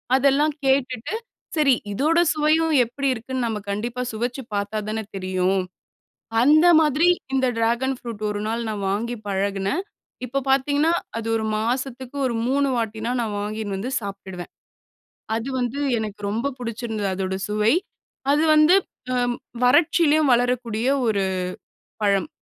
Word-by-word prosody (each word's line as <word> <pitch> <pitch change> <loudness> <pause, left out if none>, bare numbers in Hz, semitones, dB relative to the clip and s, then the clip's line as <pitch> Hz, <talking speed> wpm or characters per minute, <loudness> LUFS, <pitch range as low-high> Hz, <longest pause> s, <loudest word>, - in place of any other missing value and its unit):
அதெல்லாம் 280 +3 +3
கேட்டுட்டு, 260 - +1 0.4
சரி 290 -4 +4 0.2
இதோட 310 +10 +2
சுவையும் 310 +1 +2
எப்படி 275 +4 -3
இருக்குன்னு, 255 +1 -3
நம்ம 215 -2 -2
கண்டிப்பா 240 +5 -3
சுவைச்சு 240 +4 -3
பார்த்தா 200 +2 -2
தான 220 0 -2
தெரியும். 185 0 0 0.8
அந்த 310 +5 +6
மாதிரி, 310 +3 +3 0.3
இந்த 260 -1 +2
டிராகன் 240 +4 +1
ஃப்ரூட் 230 -3 -7
1 205 0 -3
நாள் 230 +1 -1
நா - - -2
வாங்கி 225 +5 -1
பழகுனேன். 195 - -1 0.4
இப்போ 275 +3 -2
பார்த்தீங்கன்னா, 285 +4 +3 0.3
அது 225 0 -4
1 220 - -2
மாசத்துக்கு 255 +3 -3
ஒரு 240 - -1
3 280 +1 +2
வாட்டினா, 225 0 -2
நா 230 - -1
வாங்கின்னு 210 -1 -3
வந்து 235 +7 -4
சாப்ட்டுடுவேன். 195 -3 -7 0.9
அது 230 +4 -3
வந்து 250 +3 -2 0.2
எனக்கு 210 -2 -5
ரொம்ப 235 +7 -1
புடிச்சிருந்தது, 225 -3 -3
அதோட 190 0 -2
சுவை. 215 +4 +3 0.6
அது 300 +2 +3
வந்து 305 +4 +6 0.4
அ - - +1 0.5
வறட்சியிலேயும் 305 +1 +4
வளரக்கூடிய 240 -1 0 0.2
ஒரு 200 -3 +1 0.8
பழம். 200 -2 +2
240 Hz, 130 wpm, -23 LUFS, 210-275 Hz, 0.9 s, அந்த